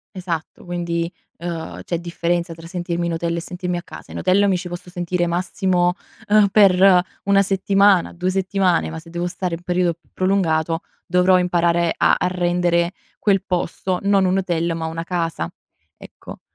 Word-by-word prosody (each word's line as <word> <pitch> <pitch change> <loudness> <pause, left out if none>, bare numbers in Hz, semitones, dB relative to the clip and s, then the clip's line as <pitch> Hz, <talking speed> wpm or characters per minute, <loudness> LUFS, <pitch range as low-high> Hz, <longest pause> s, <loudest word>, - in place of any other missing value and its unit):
Esatto, 175 -4 -5
quindi, 170 -1 -2 0.3
ehm, 170 -1 -6
c'è 170 - -2
differenza 170 0 -2
tra 165 0 -11
sentirmi 175 0 -3
in 170 - -1
hotel 170 0 -2
e - - 0
sentirmi 180 0 -4
a - - -4
casa. - - -12
In - - -6
hotel 190 +3 +3
mi 185 - +2
ci 180 0 -6
posso 175 0 -7
sentire 175 0 -1
massimo, 180 +1 +1 0.3
ehm, 205 -1 +5
per 190 -2 +5 0.2
1 200 0 +4
settimana, 195 -1 +3
2 180 +1 -2
settimane, 190 -1 +1
ma 160 0 -6
se 165 - -15
devo 175 +1 -3
stare 180 -1 -3
un 165 - -11
perio 180 -1 +1
più 165 - -31
prolungato 165 -4 +1 0.2
dovrò 180 +1 +4
imparare 170 -1 +2
a - - +4
a - - 0
rendere 175 -1 +1 0.3
quel 195 -3 +2
posto 180 0 -2
non 200 -1 +3
un 185 +1 +2
hotel 170 -2 -1
ma 165 -1 -4
una 165 +1 -4
casa. 165 - -2 0.5
Ecco. - - -12
175 Hz, 175 wpm, -21 LUFS, 170-185 Hz, 0.5 s, ehm